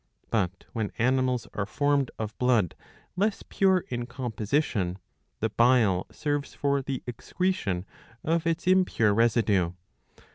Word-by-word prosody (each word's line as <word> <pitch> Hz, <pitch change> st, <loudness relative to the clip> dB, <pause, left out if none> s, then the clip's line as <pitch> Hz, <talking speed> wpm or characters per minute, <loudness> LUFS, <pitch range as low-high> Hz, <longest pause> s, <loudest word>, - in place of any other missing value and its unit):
But, 95 Hz, -4 st, -1 dB
when 110 Hz, -3 st, -2 dB
animals 130 Hz, 0 st, +1 dB
are 105 Hz, -1 st, -2 dB
formed 145 Hz, +2 st, +1 dB
of 110 Hz, 0 st, -4 dB
blood 120 Hz, -9 st, +3 dB, 0.4 s
less 205 Hz, +3 st, 0 dB
pure 190 Hz, -2 st, +2 dB
in 120 Hz, -1 st, -3 dB
composition, 115 Hz, -, -1 dB, 0.4 s
the -, -, +1 dB
bile 115 Hz, -7 st, +3 dB
serves 145 Hz, -1 st, -3 dB
for 140 Hz, -1 st, +1 dB
the 135 Hz, -1 st, -4 dB
excretion 120 Hz, -, -2 dB, 0.4 s
of 165 Hz, +1 st, +1 dB
its 165 Hz, +1 st, -1 dB
impure 180 Hz, -, +3 dB
residue. 105 Hz, -6 st, +2 dB
125 Hz, 120 wpm, -27 LUFS, 105-145 Hz, 0.4 s, blood